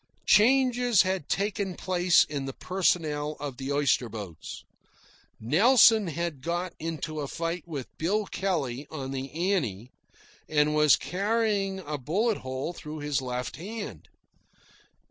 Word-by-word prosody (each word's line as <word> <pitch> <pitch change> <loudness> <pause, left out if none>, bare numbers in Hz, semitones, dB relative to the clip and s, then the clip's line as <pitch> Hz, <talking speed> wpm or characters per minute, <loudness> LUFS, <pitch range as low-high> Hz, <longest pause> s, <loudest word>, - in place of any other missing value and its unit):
Changes 245 -1 +4
had 185 -5 -2
taken 200 -2 -1
place 180 -1 +3
in 140 -2 -4
the 135 - -5
personnel 155 -5 0
of 140 -4 -5
the 135 +1 -4
oyster 140 -4 +2
boats. 100 -8 -8 0.8
Nelson 215 - +5
had 170 -3 -3
got 175 +4 -2
into 155 -1 -4
a 145 - -3
fight 165 +3 -4
with 145 -6 -7
Bill 205 +6 +1
Kelley 145 -10 -2
on 135 -4 -5
the 135 0 -5 0.2
Annie 120 - -2 0.6
and 150 0 +2
was 150 -1 +6
carrying 200 0 0
a 150 -3 -5
bullet 200 - 0
hole 130 +6 -4
through 155 -2 -8
his 145 -2 -1
left 125 -1 -4
hand. 210 +5 -7
160 Hz, 130 wpm, -27 LUFS, 140-195 Hz, 0.8 s, was